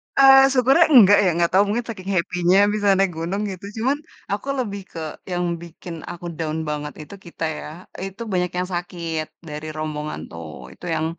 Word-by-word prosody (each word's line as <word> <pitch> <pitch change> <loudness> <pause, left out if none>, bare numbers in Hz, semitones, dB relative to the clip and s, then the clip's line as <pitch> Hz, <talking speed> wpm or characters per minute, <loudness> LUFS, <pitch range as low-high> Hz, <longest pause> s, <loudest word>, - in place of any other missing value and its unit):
Eee, 270 0 +8
syukurnya 270 +6 +5
enggak 205 -5 +8
ya, - - +4
ga 170 - +4
tau 195 +2 +5
mungkin 230 +3 -1
saking 195 -3 -6
happy-nya 180 +2 +2
bisa 205 -1 0
naik 195 -2 +2
gunung 180 +5 -2
gitu, 190 +1 -8 0.2
cuman 270 +4 +2 0.3
aku 205 +7 -3
lebih 200 -5 -3
ke 165 - -7 0.3
yang 180 0 0 0.2
bikin 170 0 -9 0.2
aku 175 0 -9
down 160 -1 -2
banget 150 -1 -4
itu, - - -13
kita 170 -1 -7
ya - - -7 0.4
itu 195 +4 -8
banyak 180 -1 +1
yang 180 - 0
sakit, 170 -2 -3 0.2
dari 150 +1 -6
rombongan 150 - -4
tuh 85 -1 -8 0.3
itu - - -13
yang, 155 0 0
180 Hz, 180 wpm, -22 LUFS, 165-205 Hz, 0.4 s, Eee